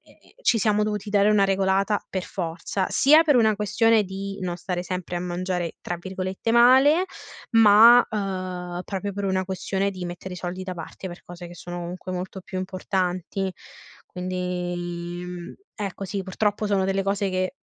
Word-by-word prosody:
e - - -23
ci 235 - +4
siamo 210 0 +2
dovuti 210 -1 -3
dare 205 0 +4
una 210 -2 +4
regolata 195 +1 +1
per 185 - -3
forza, 175 +2 -3
sia 305 +4 +6
per 295 -3 +4
una 220 -3 +4
questione 215 +1 +3
di 195 +1 -6
non 175 -1 -3
stare 180 0 -3
sempre 180 -1 -4
a 175 - -2
mangiare 180 -1 -3
tra 175 - -3
virgolette 190 +4 -3
"male", 265 +8 +6 0.5
ma 225 +2 +8
uhm, 185 -4 -4
proprio 200 0 -4
per 200 +1 -4
una 190 -1 0
questione 190 +1 -1
di 185 -2 -7
mettere 175 +1 -6
i - - -8
soldi 180 +1 -5
da 185 -1 -5
parte, 175 +3 -8
per 175 - -10
cose 175 0 -9
che 175 - -11
sono, 175 0 -7
comunque, 180 +2 -6
molto 185 +1 -5
più 185 - -8
importanti. 185 0 -2 0.5
Quindi, 180 -1 -3 0.5
mhmm, 175 -1 -7 0.2
ecco, 200 -2 -5
sì, 195 +1 -3
purtroppo, 205 +3 -1
sono 200 -2 +1
delle 195 0 0
cose 200 0 0
che 185 +6 -1
190 Hz, 175 wpm, -24 LUFS, 180-205 Hz, 0.5 s, ma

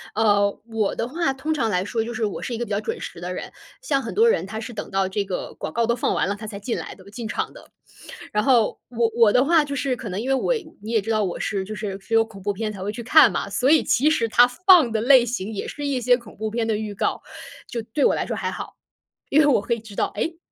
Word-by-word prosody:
呃， 205 -2 +2
我 225 -3 -1
的 230 - -2
话 310 +2 0
通 270 +4 -2
常 245 -7 0
来 180 -2 0
说， 225 +2 -1
就 235 - -5
是 220 -1 -1
我 205 - -4
是 240 - -4
一 - - -4
个 240 - -2
比 - - -11
较 200 +1 0
准 - - -4
时 170 - -8
的 180 +1 -4
人， 180 - -6 0.3
像 280 - 0
很 - - -6
多 455 +2 +5
人 460 - +2
他 220 +2 -5
是 235 +2 -7
等 215 - -6
到 195 0 0
这 200 +2 -1
个 190 -2 -5
广 - - -6
告 235 +7 +1
都 235 +1 +1
放 240 - 0
完 - - +1
了， 200 - -1
他 215 +1 -8
才 200 -1 -7
进 230 +4 -3
来 - - -6
的， 190 - -16
进 235 0 -6
场 - - -3
的。 - - -15 0.6
然 210 - +1
后 240 -3 +3
我 230 -1 0
我 230 -3 +5
的 250 - +5
话 315 +1 +4
就 280 -1 -4
是 275 -1 -1
可 230 - -8
能 195 +1 -3
因 255 - -4
为 - - +3
我 265 - +1 0.3
你 215 +2 -6
也 225 -2 +2
知 225 +3 -3
道 215 -1 +2
我 180 - -3
是 195 -2 -2
就 215 +2 -6
是 195 -1 -5
是 195 - -8
有 225 0 +6
恐 220 -3 -13
怖 205 +2 -1
片 215 +2 -3
才 195 -3 -9
会 195 - -3
去 235 +2 -7
看 310 +7 +7
嘛， - - -3
所 260 - +1
以 315 0 +5
其 285 +6 +3
实 235 -8 +1
它 245 +3 +6
放 325 0 +5
的 220 - 0
类 250 0 +6
型 225 -3 -4
也 200 - -4
是 290 - -6
一 275 -3 0
些 245 +1 +4
恐 235 -4 -12
怖 220 0 -3
片 230 +1 -1
的 220 -2 +1
预 210 -1 -4
告， - - -1 0.5
就 235 - -4
对 225 +6 -1
我 - - +4
来 - - -1
说 - - -4
还 - - -2
好。 - - -7 0.5
因 300 - +5
为 - - +4
我 285 -6 +4
可 235 - -1
以 235 - -2
知 220 -1 -13
道， - - +1
诶 330 0 -2
225 Hz, 320 characters per minute, -23 LUFS, 210-255 Hz, 0.6 s, 看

